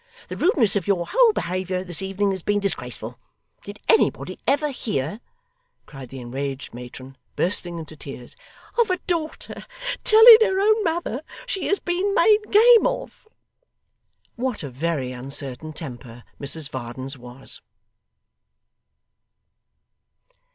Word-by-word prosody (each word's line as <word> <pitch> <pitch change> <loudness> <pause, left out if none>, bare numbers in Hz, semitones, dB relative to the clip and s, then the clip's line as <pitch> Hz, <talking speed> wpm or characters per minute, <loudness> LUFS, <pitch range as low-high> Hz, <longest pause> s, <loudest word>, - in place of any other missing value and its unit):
The - - -5
rudeness 270 - +2
of 195 -4 -1
your 185 -4 +1
whole 485 +1 +4
behaviour 185 - -3
this 175 -1 -2
evening 195 +1 -1
has 190 -1 -4
been 205 +4 0
disgraceful. 125 - -4 0.4
Did 205 +1 -9
anybody 450 - +2
ever 295 +2 +2
hear,' 205 - -3 0.7
cried 135 -4 -11
the 135 - -8
enraged 135 +3 -5
matron, 130 +2 -10 0.2
bursting 175 -1 0
into 160 -1 -8
tears, 135 -4 -10 0.4
'of 470 - +4
a 365 - +1
daughter 325 -3 -4 0.4
telling 445 +1 +10
her 385 -4 +2
own 430 +2 +3
mother 325 - -2 0.2
she 390 -6 -2
has 400 - +2
been 375 +3 -1
made 435 -3 +5
game 455 +2 +7
of!' - - -5 1.1
What 250 -5 -3
a 140 - -6
very 135 -1 -2
uncertain 135 +3 -5
temper 120 -6 -9 0.2
Mrs 145 +1 -1
Varden's 130 +2 -6
was! 125 +1 -9
180 Hz, 125 wpm, -23 LUFS, -, 1.1 s, telling